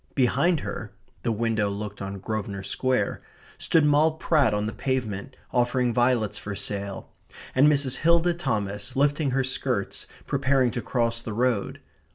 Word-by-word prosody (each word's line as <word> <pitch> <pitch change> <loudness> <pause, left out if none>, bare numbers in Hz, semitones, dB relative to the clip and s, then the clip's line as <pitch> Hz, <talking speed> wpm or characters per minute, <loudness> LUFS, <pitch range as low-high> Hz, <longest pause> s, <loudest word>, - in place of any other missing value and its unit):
Behind 140 +6 +2
her - - -5 0.3
(the 115 - 0
window 110 -2 0
looked 105 0 -5
on 100 0 -4
Grosvenor 100 -1 -4
Square) 125 0 0 0.4
stood 160 -2 +3
Moll 150 +2 +4
Pratt 155 -6 +2
on 105 0 0
the 110 - -3
pavement, 130 -3 -3 0.2
offering 125 0 +1
violets 120 -3 +2
for 100 -1 -5
sale; 100 -1 -4 0.4
and 135 +3 +5
Mrs. 140 -3 +1
Hilda 170 +3 +3
Thomas, 105 - -3
lifting 145 +1 +2
her 135 +1 +1
skirts, 130 -5 -2 0.2
preparing 135 -2 +2
to 120 - -3
cross 115 0 -1
the 110 -2 -5
road. 120 -2 0
125 Hz, 150 wpm, -26 LUFS, 105-140 Hz, 0.4 s, and